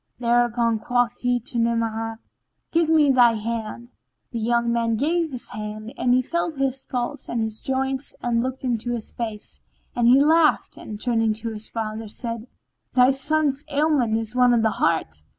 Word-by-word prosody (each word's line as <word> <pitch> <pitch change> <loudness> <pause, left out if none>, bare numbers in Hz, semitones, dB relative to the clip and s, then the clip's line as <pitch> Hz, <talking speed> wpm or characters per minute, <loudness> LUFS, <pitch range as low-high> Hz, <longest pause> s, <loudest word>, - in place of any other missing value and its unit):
Thereupon 235 -1 +2
quoth 245 +1 0
he 245 0 +1
to 235 0 -3
Ni'amah, 225 -1 -1 0.5
"Give 330 -1 +2
me 305 -3 +5
thy 245 -3 +5
hand." 230 +1 -4 0.4
The 235 - -3
young 235 +1 +1
man 230 -1 +1
gave 330 +8 +1
him 315 - -9
his 250 -2 -3
hand 215 +2 -7
and 250 - 0
he 255 +1 +4
felt 335 +1 -2
his 270 -1 -1
pulse 255 +3 -3
and 235 - -1
his 220 -1 -2
joints 265 +1 -2
and 235 -1 0
looked 260 +2 -4
in 240 -3 0
his 240 -1 -4
face; 220 -3 -5 0.3
then 240 -1 +2
he 255 +3 +7
laughed 310 +2 +3
and, 210 -1 -8
turning 225 -2 +1
to 225 +2 -4
his 220 -1 -4
father, 220 -1 -4
said, 230 +1 -5 0.5
"Thy 250 +1 +6
son's 285 0 +1
sole 285 - -4
ailment 285 -8 +2
is 225 +1 -3
one 250 -1 +5
of 225 - +2
the 220 - +3
heart." 160 - 0
240 Hz, 185 wpm, -23 LUFS, 225-265 Hz, 0.5 s, he